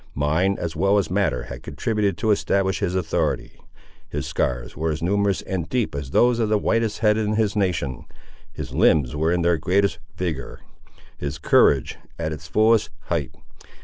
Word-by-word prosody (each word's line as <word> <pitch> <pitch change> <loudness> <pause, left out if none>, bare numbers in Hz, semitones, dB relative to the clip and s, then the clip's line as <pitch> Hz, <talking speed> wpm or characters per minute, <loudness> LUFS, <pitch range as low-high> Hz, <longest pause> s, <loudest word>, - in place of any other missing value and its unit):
Mind 80 +8 +1
as 85 -2 -4
well 100 +5 +3
as 100 -3 0
matter 90 -10 0
had - - -8
contributed 105 -5 -1
to 110 - +1
establish 100 -1 +1
his 95 -3 -1
authority. 90 -4 -1 0.5
His - - -4
scars - - -2
were 80 +1 -1
as 80 +1 -4
numerous 100 +1 +1
and 90 -4 -3
deep 125 -8 0
as 70 -2 -5
those 120 - +3
of 110 -2 +1
the 105 - +3
whitest 115 +1 0
head 105 0 +4
in 105 0 0
his 110 -1 +1
nation; 85 - -1 0.5
his - - -7
limbs 75 -4 +3
were 80 +2 +1
in 90 -1 +1
their 85 -1 +2
greatest 100 +3 +1 0.2
vigour; 80 -8 -4 0.6
his 70 +1 -4
courage 70 -4 +3 0.2
at 80 -1 -2
its 80 +2 -7
fullest 110 +3 +3 0.2
height. - - -1
90 Hz, 175 wpm, -23 LUFS, 80-105 Hz, 0.6 s, head